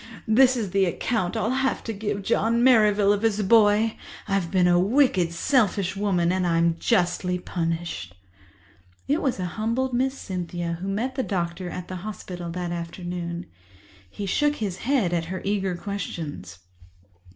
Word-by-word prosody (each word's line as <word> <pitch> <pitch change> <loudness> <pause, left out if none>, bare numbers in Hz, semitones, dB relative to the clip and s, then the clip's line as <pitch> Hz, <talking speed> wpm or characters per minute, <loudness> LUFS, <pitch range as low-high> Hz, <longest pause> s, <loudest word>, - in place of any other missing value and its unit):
This 255 +3 +5
is 210 -6 -3
the 195 0 +3
account 185 +1 -1
I'll 220 - 0
have 265 0 0
to 225 - -4
give 205 -1 -3
John 230 +4 +2
Merrivale 210 -5 +5
of 205 - -2
his 215 -2 +1
boy. 215 +1 +4 0.3
I've 195 -4 0
been 180 -1 +3
a 175 0 +4
wicked, 195 - +3
selfish 200 -1 +1
woman, 185 -4 +1
and 185 -1 0
I'm 170 0 +2
justly 180 -3 +1
punished." 165 - -4 0.9
It 290 +4 +1
was 260 -7 -1
a 180 - -1
humbled 230 +7 -1
Miss 265 +2 0
Cynthia 175 -2 -4
who 190 - -4
met 225 +7 -1
the 260 - -1
doctor 175 -4 -3
at 180 0 -6
the 185 - -5
hospital 180 -3 -7
that 175 0 -4
afternoon. 170 0 -5 0.6
He 200 - -6
shook 295 +9 +1
his 200 -8 -3
head 235 -9 +1
at 170 -1 0
her 185 +2 -4
eager 195 -2 0
questions. 160 - -6
195 Hz, 160 wpm, -25 LUFS, 175-225 Hz, 0.9 s, This